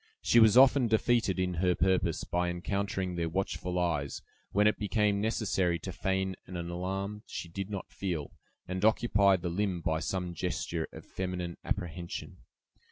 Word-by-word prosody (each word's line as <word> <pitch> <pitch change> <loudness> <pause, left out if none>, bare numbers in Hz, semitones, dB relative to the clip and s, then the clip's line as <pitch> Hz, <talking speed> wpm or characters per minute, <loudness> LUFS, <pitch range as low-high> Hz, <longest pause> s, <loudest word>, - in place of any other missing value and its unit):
She 120 - +5
was 110 0 +7
often 130 -1 +7
defeated 110 -2 +2
in 90 -1 0
her 90 -1 +3
purpose, 90 -2 +1
by 90 0 0
encountering 95 +1 -2
their 85 -1 -1
watchful 90 0 -2
eyes, 80 -6 -1 0.3
when 105 +1 +3
it 105 - +3
became 105 -1 +1
necessary 100 -5 +1
to 95 - -6
feign 95 0 -1
an 90 - -6
alarm 95 +4 -3
she - - -5
did 95 +3 -5
not 100 -3 -5
feel, 85 -7 -3 0.4
and 95 +1 -3
occupy 105 -3 +4
the 85 -1 -3
limb 95 0 -1
by 80 -1 0
some 90 0 -2
gesture 85 0 -2
of - - -11
feminine 90 -2 -4
apprehension. 85 -2 -4
95 Hz, 160 wpm, -30 LUFS, 85-100 Hz, 0.4 s, was